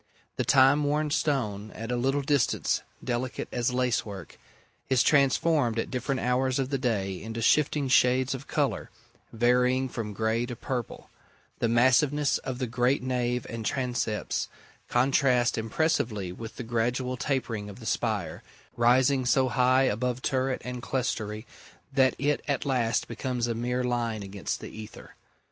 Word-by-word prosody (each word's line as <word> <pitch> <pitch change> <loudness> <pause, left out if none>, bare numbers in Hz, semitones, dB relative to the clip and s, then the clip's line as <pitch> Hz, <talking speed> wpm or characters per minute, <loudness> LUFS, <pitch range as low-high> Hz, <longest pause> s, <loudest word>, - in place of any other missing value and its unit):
The - - +1
time 135 +2 +5
worn 150 +1 0
stone, 110 -9 -1
at 115 +2 -5
a - - +1
little 135 +3 0
distance 140 -2 +1 0.2
delicate 125 +1 -3
as 120 0 0
lacework, 120 -7 -2 0.5
is 130 -2 +4
transformed 140 -3 +3
at 115 - -2
different 130 +1 -2
hours 125 +1 +1
of 135 0 -2
the 135 - 0
day 100 -7 -1
into 115 +2 -5
shifting 145 +4 +2
shades 130 +1 +3
of 135 +1 -7
colour, 145 -3 -1 0.4
varying 125 +3 +2
from 115 -4 -5
grey 110 +3 0
to 120 - -5
purple: 120 -1 -5 0.5
the 115 - +1
massiveness 130 +5 +3
of 130 -1 -5
the 130 - -1
great 125 +3 +1
nave 125 -1 -1
and 115 -1 -5
transepts 120 -4 -1 0.4
contrasts 125 -1 +3
impressively 110 - -1
with 110 +5 -8
the 125 - -6
gradual 120 +2 -1
tapering 120 -6 -2
of 100 - -11
the - - -11
spire, - - -2 0.3
rising 130 +3 +3
so 130 +1 +2
high 130 +1 +3
above 125 +1 -1
turret 130 0 0
and 125 -1 -5
clerestory 115 -4 -3 0.5
that 130 -1 +3
it 145 +1 0
at 140 0 -1
last 125 -4 0
becomes 125 -3 -2
a 120 - -1
mere 125 +2 -1
line 120 -3 -1
against 100 0 -4
the - - -7
ether. 110 -1 -11
125 Hz, 150 wpm, -27 LUFS, 115-135 Hz, 0.5 s, time